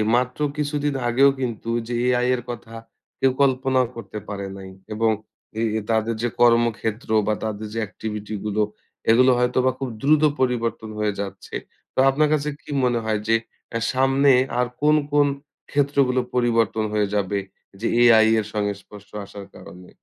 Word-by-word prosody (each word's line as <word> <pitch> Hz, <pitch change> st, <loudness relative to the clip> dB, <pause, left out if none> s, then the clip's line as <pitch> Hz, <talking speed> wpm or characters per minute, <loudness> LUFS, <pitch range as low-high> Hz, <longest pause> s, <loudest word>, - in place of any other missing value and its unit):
মাত্র 125 Hz, +2 st, 0 dB, 0.2 s
কিছুদিন 145 Hz, -1 st, -1 dB
আগেও 130 Hz, +4 st, +5 dB
কিন্তু 115 Hz, -2 st, -3 dB, 0.2 s
যে, 120 Hz, -, -4 dB
এআই 125 Hz, 0 st, +2 dB
এর 125 Hz, -, -5 dB
কথা 115 Hz, -1 st, -7 dB, 0.5 s
কেউ 135 Hz, -, +3 dB
কল্পনাও 130 Hz, -1 st, +2 dB
করতে 115 Hz, -2 st, -8 dB
পারে 100 Hz, -1 st, -4 dB
নাই। 95 Hz, -1 st, -9 dB, 0.2 s
এবং 110 Hz, +1 st, +2 dB, 0.5 s
এ -, -, 0 dB, 0.3 s
তাদের 115 Hz, 0 st, +1 dB
যে, 120 Hz, -, +1 dB
কর্মক্ষেত্র 115 Hz, -2 st, +2 dB, 0.2 s
বা 110 Hz, -, +2 dB
তাদের 110 Hz, 0 st, -4 dB
যে, 115 Hz, -, -2 dB
activity 105 Hz, +1 st, -6 dB
গুলো, 105 Hz, 0 st, 0 dB, 0.5 s
এগুলো 130 Hz, +3 st, +6 dB
হয়তোবা 125 Hz, +1 st, +2 dB
খুব 135 Hz, -, -3 dB
দ্রুত 150 Hz, +2 st, +4 dB, 0.2 s
পরিবর্তন 115 Hz, -3 st, -1 dB
হয়ে 105 Hz, -1 st, 0 dB
যাচ্ছে। 100 Hz, -1 st, -7 dB, 0.4 s
তো -, -, -2 dB
আপনার 150 Hz, +3 st, +2 dB
কাছে 150 Hz, -1 st, 0 dB
কি -, -, -18 dB
মনে 120 Hz, -1 st, +2 dB
হয় 110 Hz, -1 st, 0 dB
যে, 115 Hz, -, +4 dB, 0.4 s
এ্যাঁ 115 Hz, -1 st, -2 dB
সামনে 135 Hz, +2 st, +4 dB, 0.3 s
আর 125 Hz, -, +2 dB
কোন, 150 Hz, +1 st, +5 dB, 0.2 s
কোন 145 Hz, 0 st, +4 dB, 0.4 s
ক্ষেত্রগুলো 140 Hz, -3 st, +2 dB, 0.2 s
পরিবর্তন 115 Hz, -3 st, +2 dB
হয়ে 105 Hz, -1 st, +1 dB
যাবে। 100 Hz, 0 st, 0 dB, 0.4 s
যে, 115 Hz, -, -1 dB
এআই 115 Hz, -2 st, +7 dB
এর 110 Hz, -, -2 dB
সঙ্গে 105 Hz, -1 st, 0 dB
সংস্পর্শ 100 Hz, +1 st, -14 dB, 0.2 s
আসার 100 Hz, 0 st, -10 dB
কারণে? 90 Hz, 0 st, -13 dB
115 Hz, 160 wpm, -23 LUFS, 110-130 Hz, 0.5 s, এআই